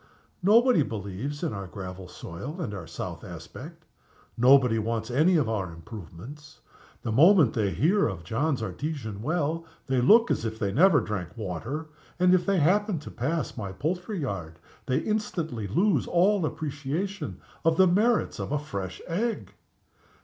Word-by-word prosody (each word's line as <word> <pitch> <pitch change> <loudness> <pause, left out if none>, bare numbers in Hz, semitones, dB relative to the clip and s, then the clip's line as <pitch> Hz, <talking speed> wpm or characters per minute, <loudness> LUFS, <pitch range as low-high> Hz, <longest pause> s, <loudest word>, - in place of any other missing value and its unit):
Nobody 230 +2 +5
believes 110 - -4
in 165 - -1
our 100 -2 -5
gravel 95 -1 -8
soil 130 - -8
and 130 -12 -3
our 90 -5 -7
south 80 - -6
aspect. - - -10 0.5
Nobody 125 -2 +5
wants 110 +1 -2
any 160 +8 +4
of 145 -7 +1
our 100 -6 -2
improvements. 110 - -11 0.4
The 115 - -2
moment 160 - +6
they 105 -3 +1
hear 190 - +2
of 90 -3 -5
John's 130 - -1
Artesian 120 -6 -4
well, 160 +3 -1 0.2
they 130 -2 +1
look 225 - +6
as - - 0
if 110 -1 -3
they 100 -3 -1
never 155 - +5
drank 95 -4 -5
water. 115 - -4 0.3
And, 180 0 +5
if 180 0 +2
they 200 -1 +3
happen 195 +4 +2
to 150 - -8
pass 155 +7 -2
my 100 -5 -5
poultry 180 - -3
yard, 95 - -4 0.3
they 130 - +1
instantly 165 - -2
lose 175 - +2
all 185 0 +3
appreciation 155 +8 -4 0.2
of 165 -1 +3
the 190 - +7
merits 210 +6 +2
of - - -4
a 150 - +2
fresh 100 -10 -6
egg!" 220 +7 -2
140 Hz, 155 wpm, -27 LUFS, 105-175 Hz, 0.5 s, the